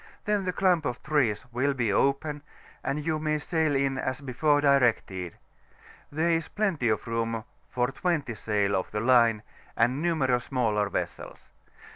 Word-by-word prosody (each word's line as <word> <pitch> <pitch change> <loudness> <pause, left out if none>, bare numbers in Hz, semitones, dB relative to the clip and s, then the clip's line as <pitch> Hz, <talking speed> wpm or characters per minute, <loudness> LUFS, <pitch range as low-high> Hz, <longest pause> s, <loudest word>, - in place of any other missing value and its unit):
then 210 -3 0
the 180 - 0
clump 180 -3 +2
of 125 - -4
trees 130 -8 +1
will 135 +4 0
be 115 -6 0
open, 145 +4 +1 0.4
and 145 +2 -2
you 160 -1 0
may 155 0 0
sail 155 -1 0
in 135 -1 0
as 130 0 -2
before 145 +2 +1
directed; 120 - +1 0.7
there 160 +3 +1
is 165 -1 0
plenty 185 - 0
of 110 - 0
room 115 -1 -2 0.3
for 125 0 0
20 155 -7 -1
sail 100 -1 0
of 95 - -2
the 105 - -3
line, 115 -2 +4 0.3
and 125 +5 +2
numerous 135 -8 +1
smaller 110 -6 0
vessels. - - -5
135 Hz, 155 wpm, -27 LUFS, 115-155 Hz, 0.7 s, line